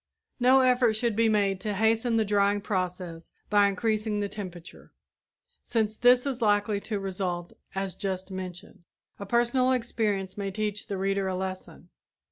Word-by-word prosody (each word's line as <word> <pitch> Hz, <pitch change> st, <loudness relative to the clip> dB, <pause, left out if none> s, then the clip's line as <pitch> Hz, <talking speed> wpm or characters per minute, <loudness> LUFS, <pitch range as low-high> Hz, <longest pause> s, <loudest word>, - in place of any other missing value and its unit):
No 255 Hz, +2 st, +6 dB
effort 250 Hz, -3 st, +4 dB
should 225 Hz, 0 st, -1 dB
be 225 Hz, +1 st, +3 dB
made 200 Hz, -3 st, +1 dB
to 210 Hz, -2 st, -2 dB
hasten 225 Hz, +2 st, +2 dB
the 220 Hz, -, +2 dB
drying 205 Hz, 0 st, +2 dB
process 180 Hz, -4 st, -4 dB, 0.2 s
by 205 Hz, -1 st, +5 dB
increasing 215 Hz, +1 st, -1 dB
the 205 Hz, -, -1 dB
temperature, 180 Hz, -5 st, -9 dB, 0.7 s
since 220 Hz, -2 st, -1 dB
this 245 Hz, +3 st, +5 dB
is 260 Hz, -3 st, -3 dB
likely 205 Hz, -1 st, +2 dB
to 210 Hz, 0 st, -4 dB
result 180 Hz, -3 st, -3 dB, 0.2 s
as 195 Hz, -1 st, -2 dB
just 190 Hz, -1 st, -4 dB
mentioned. 185 Hz, -2 st, -8 dB, 0.4 s
A 200 Hz, -, -6 dB
personal 240 Hz, +3 st, +2 dB
experience 210 Hz, -6 st, -1 dB
may 200 Hz, -1 st, -2 dB
teach 210 Hz, +1 st, -3 dB
the 200 Hz, -, -3 dB
reader 195 Hz, 0 st, 0 dB
a 185 Hz, -, -1 dB
lesson. 185 Hz, 0 st, -6 dB
205 Hz, 155 wpm, -27 LUFS, 190-225 Hz, 0.7 s, No